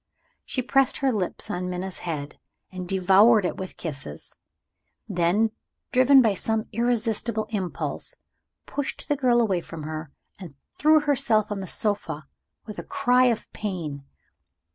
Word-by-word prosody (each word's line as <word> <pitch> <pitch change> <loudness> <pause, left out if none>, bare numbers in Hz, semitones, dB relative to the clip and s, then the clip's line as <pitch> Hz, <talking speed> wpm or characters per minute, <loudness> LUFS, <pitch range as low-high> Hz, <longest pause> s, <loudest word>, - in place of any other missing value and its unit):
She 255 - -2
pressed 270 +1 +2
her 270 -2 +1
lips 200 -6 -2
on 180 +1 -3
Minna's 180 +1 -4
head, 150 -4 -5 0.3
and 180 -1 -7
devoured 195 +3 +5
it - - -2
with 190 -1 -6
kisses; 135 - -7 0.7
then, 180 +6 +2 0.4
driven 255 +1 +6
by 220 -3 +3
some 220 +3 -1
irresistible 230 -1 0
impulse, 190 -5 -2 0.5
pushed 285 -2 -4
the 290 - +3
girl 250 -3 +3
away 195 -7 +1
from 165 -2 -9
her, 155 0 -5 0.3
and 170 -7 -10 0.2
threw 310 0 +5
herself 265 -8 +2
on 205 - -2
the 190 - -5
sofa 200 -7 -2 0.4
with 215 - -7
a - - -5
cry 250 +1 +3
of 235 -3 -1
pain. 165 -9 -4
210 Hz, 140 wpm, -25 LUFS, 180-240 Hz, 0.7 s, driven